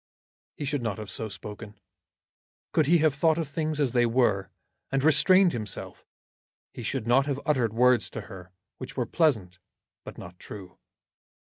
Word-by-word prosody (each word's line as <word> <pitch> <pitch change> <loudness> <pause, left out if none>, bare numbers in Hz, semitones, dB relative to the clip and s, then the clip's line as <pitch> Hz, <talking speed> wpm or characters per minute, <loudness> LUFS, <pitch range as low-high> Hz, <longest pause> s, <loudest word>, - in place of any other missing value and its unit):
He 145 - -4
should 145 -1 -1
not 115 -5 -3
have 105 -3 -7
so 110 +3 -4
spoken. 105 +2 -9 0.9
Could 155 -4 +2
he 170 +3 +5
have 155 -2 +3
thought 160 +3 +2
of 165 -3 -2
things 155 +1 -2
as 140 -4 +2
they 120 -1 +3
were, 110 -6 +1 0.4
and 135 0 0
have - - +1
restrained 170 +5 +5
himself, 110 -5 -6 0.7
he - - -8
should 120 0 -3
not 135 +4 +3
have 140 -1 -1
uttered 125 -7 +1
words 125 +1 +3
to 110 - -6
her 95 -3 -11 0.3
which - - -8
were - - 0
pleasant 110 - 0 0.4
but - - -10
not 90 +1 -11
true. 95 -4 -11
125 Hz, 170 wpm, -27 LUFS, 105-150 Hz, 0.9 s, he